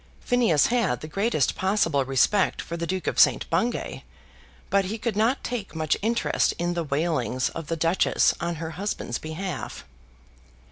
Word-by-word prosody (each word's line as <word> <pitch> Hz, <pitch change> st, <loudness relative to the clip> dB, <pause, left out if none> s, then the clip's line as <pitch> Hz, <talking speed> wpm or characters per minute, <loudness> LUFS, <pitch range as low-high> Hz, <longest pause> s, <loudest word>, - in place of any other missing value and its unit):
Phineas 235 Hz, -, +3 dB
had 230 Hz, -, +1 dB
the 155 Hz, -, -6 dB
greatest 195 Hz, -, +1 dB
possible 185 Hz, -8 st, +1 dB
respect 135 Hz, +9 st, +2 dB
for 170 Hz, -, -5 dB
the 170 Hz, 0 st, -3 dB
Duke 185 Hz, +1 st, -2 dB
of -, -, -1 dB
St. -, -, +5 dB
Bungay, 240 Hz, +1 st, -1 dB, 0.7 s
but 200 Hz, -1 st, +3 dB
he 210 Hz, +4 st, -3 dB
could 225 Hz, -1 st, -2 dB
not 225 Hz, +6 st, +1 dB
take 225 Hz, -8 st, -4 dB
much 155 Hz, -2 st, +1 dB
interest 230 Hz, +3 st, +1 dB
in 175 Hz, 0 st, -1 dB
the 170 Hz, -1 st, -1 dB
wailings 140 Hz, -4 st, 0 dB
of 165 Hz, -2 st, -7 dB
the 165 Hz, -, -2 dB
Duchess 165 Hz, +3 st, +3 dB
on 170 Hz, 0 st, -1 dB
her 160 Hz, 0 st, -5 dB
husband's 200 Hz, -, -3 dB
behalf. 160 Hz, +1 st, -5 dB
170 Hz, 160 wpm, -25 LUFS, 155-210 Hz, 0.7 s, St